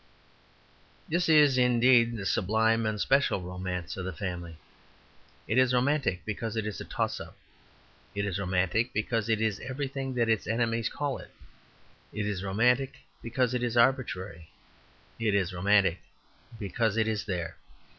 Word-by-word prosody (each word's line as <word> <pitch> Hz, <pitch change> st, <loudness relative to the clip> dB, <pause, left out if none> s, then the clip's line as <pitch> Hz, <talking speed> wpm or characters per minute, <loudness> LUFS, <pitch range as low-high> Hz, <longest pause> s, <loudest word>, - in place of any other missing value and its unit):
This 175 Hz, +1 st, 0 dB
is, 145 Hz, -4 st, +6 dB
indeed, 120 Hz, -1 st, +4 dB
the 95 Hz, -, -5 dB
sublime 110 Hz, +4 st, +2 dB
and 110 Hz, -1 st, -2 dB
special 135 Hz, -2 st, +2 dB
romance 90 Hz, -1 st, -5 dB
of 95 Hz, -, -4 dB
the 95 Hz, -, -3 dB
family. 85 Hz, -1 st, -5 dB, 0.9 s
It 110 Hz, +5 st, +2 dB
is 130 Hz, -1 st, +3 dB
romantic 130 Hz, -, +1 dB
because 110 Hz, +2 st, -4 dB
it 110 Hz, -2 st, -1 dB
is 105 Hz, -4 st, -4 dB
a -, -, -6 dB
toss -, -, -2 dB
up. -, -, -10 dB, 0.8 s
It 100 Hz, 0 st, -1 dB
is 100 Hz, -1 st, -2 dB
romantic 95 Hz, +5 st, 0 dB
because 110 Hz, +1 st, -1 dB
it 110 Hz, -1 st, +2 dB
is 110 Hz, -3 st, 0 dB
everything 135 Hz, 0 st, -4 dB
that 120 Hz, -2 st, +2 dB
its 110 Hz, -2 st, +1 dB
enemies 115 Hz, 0 st, 0 dB
call 145 Hz, -2 st, -3 dB
it. -, -, -12 dB, 0.8 s
It 105 Hz, 0 st, -3 dB
is 100 Hz, -3 st, -3 dB
romantic 125 Hz, +7 st, +2 dB, 0.3 s
because 125 Hz, +1 st, 0 dB
it 125 Hz, -, -1 dB
is 120 Hz, -1 st, -1 dB
arbitrary. 105 Hz, -, +1 dB, 0.7 s
It 110 Hz, -3 st, +1 dB
is 95 Hz, -2 st, 0 dB
romantic 95 Hz, -1 st, +3 dB, 0.6 s
because 110 Hz, +1 st, -1 dB
it 110 Hz, -1 st, +2 dB
is 110 Hz, -2 st, -2 dB
there. 90 Hz, -5 st, -4 dB
110 Hz, 155 wpm, -29 LUFS, 95-125 Hz, 0.9 s, is